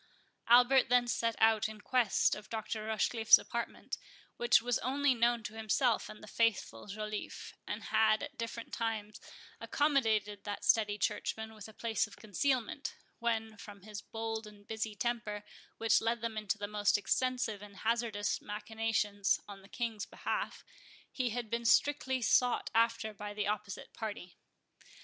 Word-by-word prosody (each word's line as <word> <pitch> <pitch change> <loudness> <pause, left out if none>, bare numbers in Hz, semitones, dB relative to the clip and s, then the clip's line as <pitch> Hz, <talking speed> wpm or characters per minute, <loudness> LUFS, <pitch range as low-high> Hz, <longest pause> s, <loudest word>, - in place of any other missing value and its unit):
Albert 245 +2 +6
then 245 0 +5
set 230 -1 0
out 220 -1 +4
in 215 -1 -9
quest 240 -2 +2
of 210 - -7
Dr. 220 -1 -4
Rochecliffe's 220 +1 +5
apartment, 235 0 -5 0.4
which 240 0 +5
was 240 +1 0
only 275 +2 +2
known 235 -1 +2
to 210 - -6
himself 225 +2 +1
and 215 - -11
the - - -10
faithful 210 - 0
Joliffe, 215 +1 -5
and - - -4
had 215 -1 +3
at 290 0 -7
different 230 -2 -6
times 220 -2 -3 0.4
accommodated 220 -9 +1
that 205 0 -5
steady 210 -1 +3
churchman 220 +1 -2
with 215 -2 -10
a - - -11
place 225 0 0
of 205 - -14
concealment, 240 +4 -1 0.2
when, 225 -2 -1
from 200 -2 -11
his 210 -1 -7
bold 225 -1 -4
and 205 -1 -15
busy 220 -1 -3
temper, 210 -2 -2 0.3
which 225 0 +3
led 230 0 0
him 230 -1 -2
into 215 0 -1
the 205 - -3
most 210 0 +2
extensive 250 -1 0
and 205 -1 -11
hazardous 225 -3 0
machinations 210 -1 0
on 200 -1 -10
the 195 - -17
King's 225 -4 -3
behalf, - - -3 0.5
he 255 -2 -1
had 235 0 -3
been 235 +2 -2
strictly 260 +1 +3
sought 245 +2 +3
after 230 -1 +2
by 205 0 -7
the 210 -1 -1
opposite 210 -1 -4
party. 205 -5 -6
220 Hz, 155 wpm, -33 LUFS, 210-235 Hz, 0.5 s, Albert